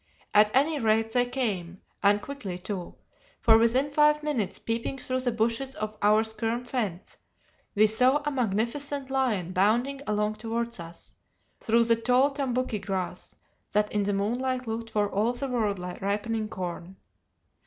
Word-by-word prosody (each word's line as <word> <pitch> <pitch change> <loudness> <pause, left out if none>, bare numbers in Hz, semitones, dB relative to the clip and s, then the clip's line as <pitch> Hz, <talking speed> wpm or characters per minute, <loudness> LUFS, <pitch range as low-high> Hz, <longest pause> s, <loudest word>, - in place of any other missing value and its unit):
At 210 0 +6
any 295 +3 +3
rate 225 -1 +1
they 245 0 +3
came, 190 -9 -2 0.2
and 205 0 +3
quickly 260 -11 -5
too, 180 -1 -6 0.4
for 225 -1 +6
within 255 +5 +2
five 300 +1 +4
minutes, 255 -10 -1
peeping 230 +4 -3
through 255 0 -2
the 250 -1 0
bushes 230 +4 -1
of 215 0 -4
our 215 +1 +4
skerm 225 +2 -2
fence, 215 -8 -4 0.6
we 210 +1 +6
saw 250 +6 +4
a 295 - 0
magnificent 265 +4 -1
lion 225 -10 0
bounding 235 +9 +1
along 210 0 0
towards 230 0 -3
us, 170 0 -9 0.5
through 230 +1 +3
the 230 0 +4
tall 250 +5 +3
tambouki 255 -5 -1
grass, 190 -2 -4 0.4
that 210 0 +2
in 210 - +1
the 200 0 0
moonlight 250 +6 -1
looked 225 0 -4
for 210 -2 +1
all 215 +4 0
the 265 +3 -2
world 220 -6 0
like 180 0 -7
ripening 210 +2 -1
corn. 180 -2 -6
225 Hz, 155 wpm, -27 LUFS, 205-255 Hz, 0.6 s, At